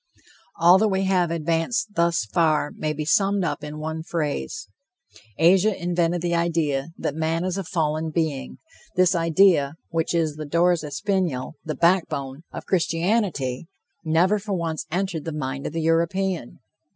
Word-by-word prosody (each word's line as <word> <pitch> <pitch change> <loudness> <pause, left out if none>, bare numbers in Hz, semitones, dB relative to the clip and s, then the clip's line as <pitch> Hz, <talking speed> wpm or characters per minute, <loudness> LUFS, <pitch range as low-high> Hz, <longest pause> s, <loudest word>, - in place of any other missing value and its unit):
All 175 +3 +7
that 220 - +3
we 190 -1 0
have 185 -3 +2
advanced 170 +6 -1
thus 170 - +1
far 155 +3 +1
may 155 - -2
be 150 0 -4
summed 195 +5 +2
up 165 - -2
in 150 0 -6
one 160 +1 -4
phrase: 150 - -3 0.7
Asia 190 +5 +4
invented 175 -1 0
the 175 -1 0
idea 165 -5 0
that - - -2
man 160 +2 -1
is 185 -1 -1
a 195 - -3
fallen 160 -2 -1
being. 155 -4 -2 0.4
This 185 0 +4
idea, 165 -3 +3
which 165 0 -1
is 160 -3 0
the 155 - -5
dors 170 +3 +2
espinal, 155 -3 -2
the 155 -1 -4
backbone 150 -5 +1
of - - -7
Christianity, 165 - 0 0.4
never 175 +6 +2
for 205 0 -4
once 165 -3 -3
entered 175 -2 -2
the 165 - -4
mind 135 -1 -3
of - - -6
the 165 - -2
European. 165 - 0
165 Hz, 155 wpm, -24 LUFS, 155-180 Hz, 0.7 s, All